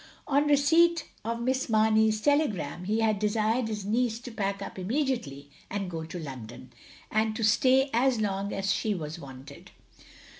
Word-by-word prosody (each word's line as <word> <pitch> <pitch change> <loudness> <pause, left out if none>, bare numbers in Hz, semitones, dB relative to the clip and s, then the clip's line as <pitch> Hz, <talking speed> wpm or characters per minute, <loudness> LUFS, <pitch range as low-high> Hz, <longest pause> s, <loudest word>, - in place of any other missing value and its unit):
On 290 +1 +2
receipt 320 +4 +4 0.2
of 230 +2 -3
Miss 260 +1 0
Mamey's 220 0 +3
telegram 210 - 0
he 215 +3 0
had 215 -2 +1
desired 220 +3 +1
his 210 -3 -4
neice 225 +2 0
to 245 - -7
pack 200 -2 -2
up - - -8
inmiediately 195 - -2 0.2
and 195 -2 -3
go 160 -1 -5
to 170 - -7
London, 130 -5 -9 0.4
and 215 0 +1
to 225 - -3
stay 260 +5 +4
as 245 0 +2
long 200 -1 -1
as 195 0 -1
she 215 -2 -1
was 160 -1 -6
wanted. 135 -1 -12
215 Hz, 160 wpm, -28 LUFS, 185-250 Hz, 0.4 s, receipt